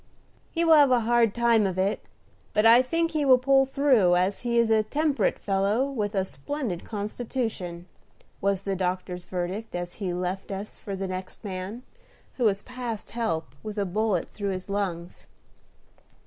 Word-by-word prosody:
"He 335 0 0
will 325 - +6
have 290 -3 +7
a 250 -2 +4
hard 235 -1 +3
time 230 -2 +3
of 185 -1 -4
it, 195 +2 0 0.5
but 210 - +3
I 230 +2 +8
think 330 +6 0
he 310 -2 0
will 260 -2 +7
pull 270 +1 +3
through, 260 -10 +4
as 185 +3 +1
he 235 -1 -1
is 230 -1 +3
a 220 -1 +5
temperate 290 +6 0
fellow, 200 +5 +1
with 215 -6 -3
a 190 -1 +1
splendid 250 - -4
constitution," 210 -5 -4 0.6
was 195 -1 0
the 195 -1 -1
doctor's 180 -1 -3
verdict, 185 +5 -4
as 175 0 -4
he 185 -3 -1
left 180 +2 -3
us 200 +1 -6
for 200 - -5
the 195 0 -3
next 185 0 -6
man, 195 +4 -5 0.5
who 250 - +1
was 200 -1 +2
past 245 -4 -6
help, 165 -9 -2
with 215 -1 -7
a 200 - +1
bullet 210 +3 0
through 200 -1 -4
his 190 +1 -4
lungs. 180 -4 -3
210 Hz, 175 wpm, -26 LUFS, 185-245 Hz, 0.6 s, I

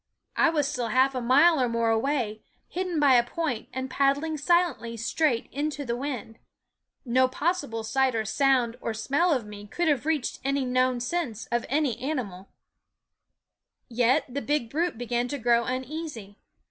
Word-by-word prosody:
I 340 - +4
was 300 -4 +1
still 250 -5 -2
half 260 +4 +3
a 255 - -2
mile 285 +6 +5
or 245 - +1
more 230 -1 +1
away, 225 -2 -1 0.3
hidden 360 -2 -2
by 285 -3 +5
a 240 -1 +6
point 250 -3 -3
and 260 0 -4
paddling 280 +4 +1
silently 305 -7 +1
straight 240 +1 0
into 290 +1 -3
the 235 -1 -1
wind. 245 -4 -5 0.7
No 255 +1 +3
possible 285 -5 -2
sight 260 +3 +1
or 220 -1 -1
sound 250 0 +2
or 225 - -3
smell 285 +10 +1
of 255 -7 0
me 205 0 -10
could 345 +10 -1
have 290 -1 +1
reached 310 -5 -1
any 275 0 0
known 255 -1 +1
sense 250 -5 -3
of 240 0 -1
any 275 -4 0
animal; 235 -10 -4 1.4
yet 245 +5 +2
the 275 +2 -4
big 285 -6 -1
brute 330 -1 -1
began 240 0 -1
to 285 - -4
grow 235 -1 +2
uneasy. 255 -5 -5
255 Hz, 165 wpm, -26 LUFS, 235-295 Hz, 1.4 s, a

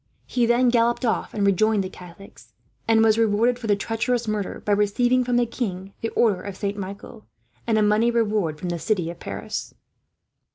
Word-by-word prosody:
He 240 -2 0
then 240 +1 +4
galloped 235 +1 +2
off 225 - -1
and 205 -2 -1
rejoined 205 +1 +2
the - - -4
Catholics; 180 +1 -14 0.3
and 225 0 +4
was 220 0 +4
rewarded, 230 +3 +2
for 230 - -6
the 205 - +3
treacherous 230 +3 -1
murder, 210 -2 -3
by 210 - 0
receiving 240 +5 +2
from 245 0 -1
the 245 - +3
king 195 -5 -5
the 225 - -1
order 210 -6 +2
of 195 -1 -7
Saint 200 -1 -2
Michael, 200 - -8 0.4
and 225 -2 +2
a 215 - +3
money 210 +3 +3
reward 210 -9 0
from 175 +3 -5
the 170 -1 -3
city 180 -4 -1
of 170 - -13
Paris. - - -6
215 Hz, 195 wpm, -23 LUFS, 200-235 Hz, 0.4 s, then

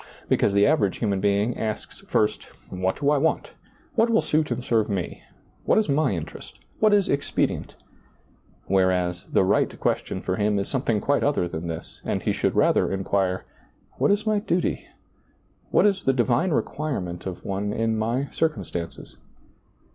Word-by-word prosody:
Because 100 - +2
the 100 - +5
avera^ 120 -8 +3
human 100 -4 -1
eing 105 +3 +1
asks 110 -1 -4
first, 105 - +1 0.2
" - - -27
What 95 0 0
do 145 0 +2
I 150 - +3
want? 160 +3 0 0.4
what 230 0 +3
will 225 -1 +3
suit 155 0 +1
and 125 +1 -3
serve 110 -2 +2
me? 95 -4 -3 0.4
what - - +3
is 220 -7 +2
my 140 -1 +2
interest? 85 -4 -7 0.2
what 215 0 +4
is 205 -2 +4
expedient? 140 0 -1 0.5
" - - -34
whereas, 90 -2 +1
the - - +3
right - - +1
question - - -1
for 95 0 -2
him 105 0 +1
is 100 - -1
something 120 -6 0
quite 145 - +1
other 140 -11 +1
than 85 0 -5
this, 80 -1 -7
and - - -2
he - - +1
should - - 0
rather - - +3
inquire, 95 -1 0 0.2
" - - -37
What - - +3
is 205 +1 +2
my 215 -1 +2
duty? 180 -4 -1 0.8
what - - +4
is 195 -2 +2
the 135 - +3
divine 125 +7 +2
requirement 130 - -2
of 90 -2 -7
one 100 +1 -2
in 115 +1 0
my 115 +6 -1
circum 155 -11 0
stances 85 -1 -7
110 Hz, 180 wpm, -25 LUFS, 95-150 Hz, 0.8 s, the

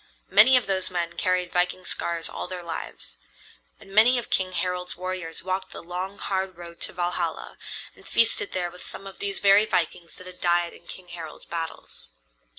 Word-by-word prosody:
Many 220 +7 +9
of 250 - +1
those 190 -1 0
men 170 -2 -1
carried 180 -1 +1
viking 180 +1 +1
scars 170 -1 -1
all - - -5
their 180 -1 -6
lives. 165 - -6 0.6
And 195 - -13
many 230 +5 +7
of 240 - -4
King 185 -1 +1
Harald's 180 -1 -2
warriors 180 -3 -4
walked 185 +1 -2
the - - -7
long, 180 +3 -4
hard 190 -2 -2
road 170 -1 -10
to - - -1
Valhalla, 175 0 -2 0.4
and - - -16
feasted 230 -3 +3
there 175 -2 -1
with 180 - -12
some 195 - -6
of 195 - -10
these 200 -1 -1
very 200 +1 +6
vikings 170 -3 -1
that 185 - -12
had 185 0 -11
died 175 -1 +2
in - - -17
King 180 -1 -9
Harald's 165 -3 -8
battles. 165 - -6
180 Hz, 185 wpm, -26 LUFS, 175-190 Hz, 0.6 s, Many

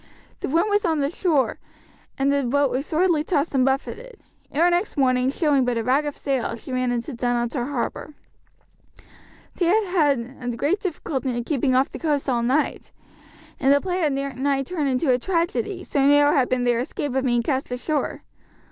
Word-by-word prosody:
The - - -4
wind 330 +7 +2
was 410 0 +1
on 325 -4 +1
the 280 0 0
shore, 325 -7 0 0.6
and 275 +1 +2
the 280 - +2
boat 280 +2 +1
was 270 +4 -2
sorely 330 -1 +2
tossed 310 -2 0
and 265 -2 +3
buffeted. 405 - -2 0.3
Ere 330 +4 +3
next 350 +1 -1
morning, 255 -1 +2
showing 285 -2 +2
but 245 -1 0
a 230 - -1
rag 275 +5 +2
of 290 - -5
sail, 265 -5 -1
she 245 +3 -9
ran 255 -1 0
into 240 +3 -3
Dunottar 240 +1 -1
harbour. 290 +2 -4 1.4
They 355 - +1
had 355 -7 +2
had 245 0 -6
great 325 - +1
difficulty 300 -7 -3
in 240 - -2
keeping 265 -1 0
off 265 +2 +2
the - - -7
coast 295 -4 -1
all 245 -3 +1
night, 265 +6 0 0.7
and 275 0 +3
the 285 - +5
play 365 +3 -2
had 305 -5 +1 0.3
nigh 275 0 +1
turned 300 -2 -2
into 260 +2 +1
a 250 - +1
tragedy, 365 - -1
so 280 - 0
narrow 290 0 +5
had 260 -3 +2
been 255 -1 0
their 240 -1 +2
escape 260 +2 -3
of 265 0 0
being 240 -2 +1
cast 265 0 -2
ashore. 290 +5 -2
280 Hz, 190 wpm, -23 LUFS, 255-315 Hz, 1.4 s, the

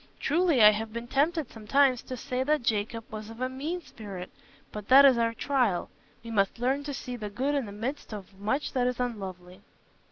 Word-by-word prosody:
Truly, 325 -6 +3
I 210 - +10
have 220 +1 -4
been 235 +1 -5
tempted 290 +2 0
sometimes 255 +3 +2
to 255 - -7
say 250 +2 -3
that 300 0 +1
Jacob 225 +1 -1
was 215 0 -7
of 225 +1 -11
a 255 - 0
mean 295 +8 -4
spirit. 195 -8 -9 0.4
But 210 -1 -7
that 275 +2 +9
is 265 -2 +7
our 230 0 +1
trial: 245 -9 0 0.3
we 230 - -7
must 200 -1 +1
learn 260 +4 0
to 290 - -4
see 250 0 -6
the 215 -3 -5
good 260 +8 -1
in 275 -6 -1
the - - -8
midst 235 +8 -5
of 205 -2 -8
much 240 +9 -1
that 250 -1 +1
is 250 -1 -2
unlovely." 190 -6 -5
240 Hz, 210 wpm, -28 LUFS, 210-270 Hz, 0.4 s, I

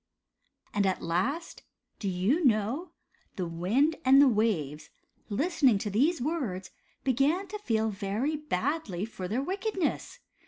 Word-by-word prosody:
And 205 -1 +2
at 190 - -1
last, 250 - -2 0.4
do 200 - -2
you 195 - +1
know, 245 - +1 0.5
the 185 - -2
wind 205 - +1
and 265 +1 +7
the 285 - +8
waves, 165 - 0 0.4
listening 275 - +3
to 205 +1 -3
these 290 - +2
words, 240 - -3 0.3
began 275 +9 +2
to 420 +2 -5
feel 220 - 0
very 205 +10 -2
badly 275 - -2
for 190 -5 -6
their 235 +8 -1
wickedness. 380 +1 -2
235 Hz, 130 wpm, -29 LUFS, 195-305 Hz, 0.5 s, the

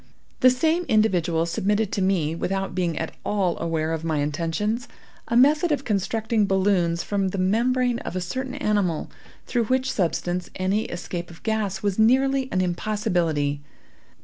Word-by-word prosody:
The 255 - +7
same 320 +7 +1
individual 175 - +2
submitted 205 +4 0
to 200 - -1
me, 180 -5 +1
without 195 +3 -2
being 175 -3 -1
at 160 - -3
all 190 -5 0
aware 165 -1 -1
of 160 0 -3
my 160 -2 0
intentions, 165 +10 -1 0.4
a 235 - +1
method 300 +6 +4
of 280 -2 -1
constructing 220 +1 0
balloons 185 -3 +1
from 200 -2 0
the 190 - -3
membrane 240 +6 +1
of - - -6
a - - 0
certain 255 +9 -4
animal, 205 - 0 0.3
through 240 -2 0
which 260 +3 +1
substance 180 -1 -1
any 195 +3 0
escape 175 0 -5
of 170 - -14
gas 215 -3 -1
was 200 0 0
nearly 265 +3 +3
an 185 - +1
impossibility. 175 -6 0
195 Hz, 155 wpm, -24 LUFS, 170-230 Hz, 0.4 s, The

